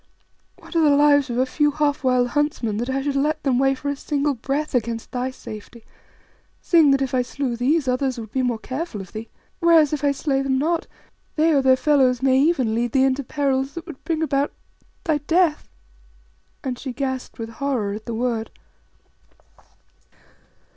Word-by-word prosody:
What - - -13
are 330 - +4
the 295 -2 +5
lives 285 -2 +4
of 240 - -2
a 255 - +3
few 295 +3 +1
half 295 -1 0
wild 250 -1 +2
huntsmen 270 -6 -1
that 240 +3 -3
I 270 +1 -1
should 285 -1 -1
let 300 +2 0
them 255 -3 +2
weigh 270 0 +3
for 285 +2 -7
a 285 - 0
single 290 0 -1
breath 280 +5 -3
against 230 -2 -2
thy 250 +1 -2
safety, 225 -2 -10 0.8
seeing 325 -4 +4
that 275 0 +3
if 265 - -4
I 255 - +3
slew 250 0 -3
these, 270 +5 +1
others 255 0 0
would 220 -2 -8
be 260 - 0
more 245 -2 0
careful 260 +1 -5
of 195 - -10
thee? 220 +1 -7 0.3
Whereas 330 -4 +5
if 295 - -2
I 285 - +3
slay 275 -1 -1
them 270 -1 0
not, 325 +4 0 0.5
they 320 +1 +3
or 280 - +4
their 260 -1 +5
fellows 260 -3 +2
may 265 -1 +4
even 275 -8 +2
lead 235 +1 -1
thee 265 -1 +4
into 270 +1 0
perils 270 0 -1
that 335 0 -6
would 325 -6 -11
bring 320 -1 -1
about 285 -2 0 0.5
thy 315 -5 +1
death," 325 +1 +1 0.9
and 255 -2 -4
she 260 -3 -5
gasped 260 -1 -4
with 225 -1 -5
horror 230 -4 -2
at 215 +1 -8
the 230 - -3
word. 230 -1 -1
270 Hz, 190 wpm, -22 LUFS, 250-295 Hz, 0.9 s, the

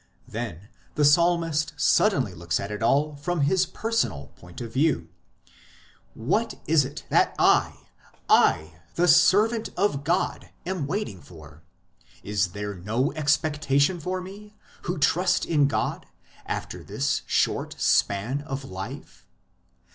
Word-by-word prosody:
Then 105 -5 -6 0.3
the 150 - +3
psalmist 165 0 +3
suddenly 135 - +2
looks 85 0 -2
at 100 +1 -5
it 105 - -5
all 145 +5 +1
from 175 +2 -2
his 180 +6 +2
personal 200 - -2
point 90 -1 -13
of 115 -2 -7
view; 135 - +1 1.1
what 200 - -1
is 155 -2 +4
it 140 +3 -8
that - - +3
I - - +2 0.4
I, 80 +1 +3 0.2
the 175 +1 +2
servant 205 +7 +4
of 180 -8 0
God 175 +5 -1 0.2
am 175 -6 -3
waiting 150 - -4
for? 75 -3 -14 0.6
Is 100 -3 -1
there 105 0 -4
no 110 +9 -1
expectation 150 +1 +1
for 185 +3 -3
me, 205 +3 -11 0.3
who 175 +1 -2
trust 180 +5 +2
in 145 -4 +3
God, 140 - -2 0.4
after - - -5
this - - -1
short - - 0
span 115 +8 +1
of 135 -2 -6
life 95 -5 -9
145 Hz, 130 wpm, -25 LUFS, 105-175 Hz, 1.1 s, is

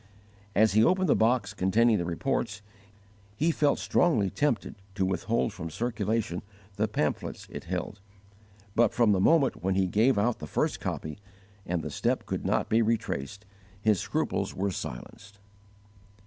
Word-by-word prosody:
As 110 +1 +5
he 110 +1 +5
opened 185 +4 +3
the - - +4
box 115 -2 +2
containing 105 +3 +3
the 85 - -2
reports, 105 +4 -2 0.7
he 160 +7 +2
felt 145 -3 +2
strongly 110 - +2
tempted 145 -5 0 0.2
to 95 -2 +1
withhold 110 +4 0
from 85 -5 -6
circulation 110 -1 -2 0.3
the 110 +2 +1
pamphlets 75 -8 -2
it - - -7
held; 90 +3 -4 0.7
but 120 - +3
from 115 -3 +4
the 95 - +2
moment 145 +4 +3
when 95 0 +1
he 95 0 +3
gave 110 +8 +3
out 110 +3 +1
the 75 - -7
first - - -1
copy, 75 +4 -4 0.5
and 85 -1 -1
the - - -5
step - - -1
could - - -3
not - - +1
be 115 +1 +3
retraced, 105 - -2 0.3
his 105 -2 +2
scruples - - -2
were 100 +1 -1
silenced. 100 +8 -8
105 Hz, 155 wpm, -28 LUFS, 95-120 Hz, 0.7 s, As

